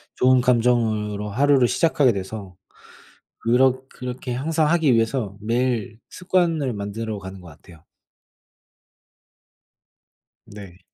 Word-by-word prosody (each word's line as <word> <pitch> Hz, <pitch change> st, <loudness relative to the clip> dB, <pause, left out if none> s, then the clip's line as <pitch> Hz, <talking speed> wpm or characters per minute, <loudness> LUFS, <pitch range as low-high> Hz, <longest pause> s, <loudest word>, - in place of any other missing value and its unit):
좋은 130 Hz, 0 st, +4 dB
감정으로 110 Hz, -4 st, +1 dB
하루를 135 Hz, +2 st, +3 dB
시작하게 140 Hz, -4 st, +2 dB
돼서 95 Hz, -1 st, -7 dB, 0.8 s
그렇 130 Hz, +2 st, +2 dB
그렇게 125 Hz, -1 st, -6 dB
항상 155 Hz, +3 st, 0 dB
하기 160 Hz, -7 st, +3 dB
위해서 115 Hz, -3 st, -1 dB
매일 115 Hz, 0 st, -1 dB
습관을 170 Hz, -7 st, 0 dB
만들어가는 100 Hz, -2 st, -6 dB
것 90 Hz, -, -13 dB
같아요. 80 Hz, +1 st, -17 dB, 2.6 s
네. 100 Hz, -3 st, -12 dB
120 Hz, 230 characters per minute, -22 LUFS, 105-130 Hz, 2.6 s, 좋은